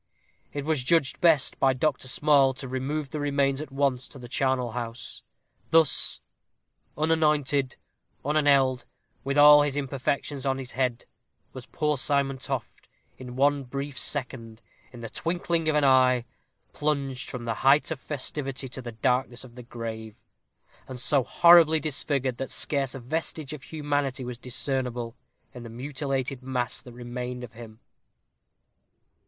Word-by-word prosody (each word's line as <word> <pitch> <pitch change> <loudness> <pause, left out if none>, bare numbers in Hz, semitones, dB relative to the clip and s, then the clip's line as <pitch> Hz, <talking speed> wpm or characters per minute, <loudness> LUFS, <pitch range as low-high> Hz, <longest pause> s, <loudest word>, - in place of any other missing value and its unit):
It 145 -1 -4
was 155 -5 0
judged 160 0 +1
best 160 -6 +4
by 135 -1 +4
Dr. 130 0 -1
Small 135 -1 +3
to 135 - -7
remove 135 +3 -3
the 155 - -3
remains 140 -1 +1
at 155 - -7
once 135 -2 0
to - - -10
the 125 -2 -9
charnel 130 -1 0
house. 120 0 -6 0.5
Thus 160 -4 +2 0.8
"unanointed, 150 -4 +1 0.5
unaneled, 140 -4 +3 0.4
with 140 +1 -1
all 150 0 +9
his 145 -1 0
imperfections 140 0 -2
on 135 -1 0
his 130 -2 -7
head," 125 -2 -1 0.5
was 130 -2 -9
poor 150 -3 -1
Simon 135 -1 0
Toft, 130 -4 -6 0.3
in 125 -1 -8
one 140 +1 +2
brief 140 +2 -5
second, 120 -7 -2 0.3
in 120 -2 -11
the 115 - -6
twinkling 170 -1 -1
of 155 - +1
an 150 - +3
eye, 130 -2 +4 0.5
plunged 140 -4 -2
from 120 -2 -6
the 115 - -1
height 140 +4 +4
of 160 - -3
festivity 135 -1 -4
to 130 - -7
the 120 -2 -7
darkness 125 +2 0
of 125 -2 -13
the 125 - -10
grave, 115 -2 -7 0.7
and 130 -1 -7
so 135 +1 +2
horribly 165 +2 +6
disfigured, 140 -4 -1
that 135 - -4
scarce 135 -3 0
a - - -5
vestige 155 +2 -3
of 150 - -8
humanity 145 -4 -2
was 120 -1 -6
discernible 125 -2 -3 0.4
in 125 - -9
the 115 - -9
mutilated 135 +1 -3
mass 125 -2 -2
that 125 - -12
remained 125 +1 -6
of 115 -2 -9
him. 110 -1 -12
135 Hz, 150 wpm, -27 LUFS, 125-145 Hz, 0.8 s, all